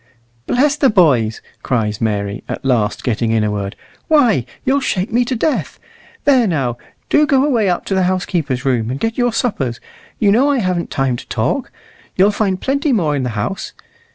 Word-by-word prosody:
"Bless 285 +3 +2
the 275 -3 +4
boys!" 130 - +2 0.2
cries 110 -4 -1
Mary, 100 -2 -2
at - - -5
last 115 -5 0
getting 115 -1 0
in 110 -1 +2
a 105 - 0
word; 100 -1 -4 0.3
"why, 240 - +3 0.2
you'll 275 +2 +3
shake 200 -5 -2
me 245 +1 +3
to 255 - -2
death. 290 +6 -1 0.5
There, 260 -5 +4
now, 130 -9 -1 0.3
do 300 0 +4
go 275 -2 +3
away 230 -9 +2
up 175 - -1
to - - -2
the 190 - +2
housekeeper's 160 -8 -2
room 120 -4 +1
and 130 +2 -3
get 225 0 -1
your 245 -1 +2
suppers; 140 - -1 0.4
you 205 -2 +3
know 255 +7 +4
I 285 - +2
haven't 185 -6 -1
time 135 -4 0
to - - -11
talk. - - -1 0.4
You'll 195 +3 +4
find 200 -3 -1
plenty 280 +4 0
more 165 - +1
in 140 - -1
the 125 - -2
house. 105 - -3
180 Hz, 190 wpm, -17 LUFS, -, 0.5 s, the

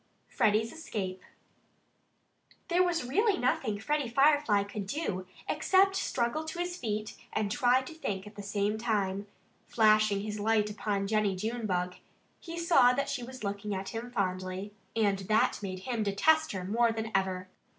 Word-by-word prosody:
XVI - - -22
FREDDIE'S 220 +1 +2
ESCAPE 190 - -5 1.5
There 350 +1 +3
was 345 -6 +1
really 405 - +2
nothing 245 -4 0
Freddie 285 +4 -1
Firefly 275 -5 +4
could 200 -1 -6
do 195 - -3 0.2
except 385 +1 +3
struggle 260 -3 -1
to 315 +2 -6
his 350 0 -2
feet 215 -8 -3 0.2
and 205 -2 0
try 255 +1 +3
to 260 - -9
think 200 -11 -4
at 210 - -11
the 205 - -8
same 205 +1 -1
time. 205 -3 -1 0.4
Flashing 215 -2 +4
his 210 0 -4
light 210 0 +2
upon 205 -1 -2
Jennie 210 -1 +1
Junebug 185 -4 -2 0.4
he 335 0 -8
saw 300 -8 +5
that 275 +2 -1
she 265 - -2
was 255 0 -9
looking 200 0 -3
at 190 0 -4
him 230 +1 -5
fondly. 185 -2 -3 0.2
And 205 -3 +2
that 215 +3 +1
made 185 -2 -5
him 235 +1 -2
detest 310 +11 +3
her 185 -2 -4
more 230 +5 +2
than 225 0 -4
ever. 185 -1 0
215 Hz, 160 wpm, -30 LUFS, 200-260 Hz, 1.5 s, saw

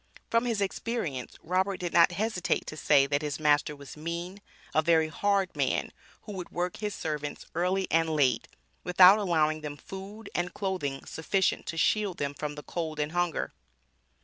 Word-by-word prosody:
From 230 +1 +3
his 230 -4 0
experience 195 - -3
Robert 185 +3 0
did 175 -1 -3
not 170 +1 +6
hesitate 210 -1 0
to - - -6
say 140 -2 +4
that 145 +1 0
his 150 -1 -3
master 150 0 +3
was 140 -2 -11
"mean," 170 +5 -5 0.3
"a 155 - +4
very 160 -1 +3
hard 200 +2 +1
man," - - 0 0.3
who 210 - -8
would 185 -3 -6
work 180 +1 -2
his 210 -1 -3
servants 150 -2 -4
early 185 +3 +1
and 165 0 +3
late, 135 -7 +2 0.4
without 180 +3 +7
allowing 155 -5 +1
them 145 -1 -6
food 200 +4 -9
and 175 0 -2
clothing 180 -9 -2
sufficient 190 +4 0
to 165 - -4
shield 205 +1 +2
them 140 0 -2
from 150 +1 -5
the 150 - -8
cold 160 -3 -4
and 150 +1 -1
hunger. 175 -2 -1
170 Hz, 175 wpm, -29 LUFS, 150-190 Hz, 0.4 s, without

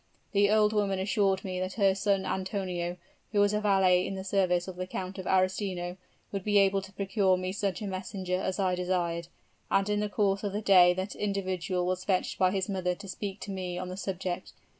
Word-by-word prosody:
The 200 -1 +4
old 215 0 +4
woman 200 -2 +1
assured 195 0 +1
me 185 -1 -3
that 185 0 -3
her 195 -3 +3
son 195 0 +1
Antonio, 185 -2 -2 0.3
who 210 - +1
was 205 0 +4
a 210 - +1
valet 190 -3 +4
in 195 - -4
the 190 - -5
service 185 -2 +1
of 185 - -6
the 185 0 -4
Count 185 +1 -5
of 185 - -6
Arestino, 185 -1 0 0.4
would 195 -2 -3
be 205 0 +2
able 195 0 +4
to 195 0 -11
procure 195 -1 +2
me 185 0 -3
such 195 0 -2
a - - -3
messenger 185 -1 -3
as 190 -1 -2
I 190 -2 +1
desired, 175 -2 -1 0.4
and 195 0 +2
in 210 0 +1
the 210 0 -1
course 200 -1 +1
of 200 -2 -2
the 210 - -2
day 180 -3 +7
that 185 +2 -3
individual 185 -3 -1
was 185 0 -1
fetched 185 -1 0
by 185 - +5
his 190 -1 -1
mother 185 -3 -1
to 200 +2 -11
speak 195 +1 -5
to 200 - -5
me 180 -2 -4
on 180 0 -4
the 185 - -5
subject. 185 -2 -4
190 Hz, 220 wpm, -29 LUFS, 185-200 Hz, 0.4 s, day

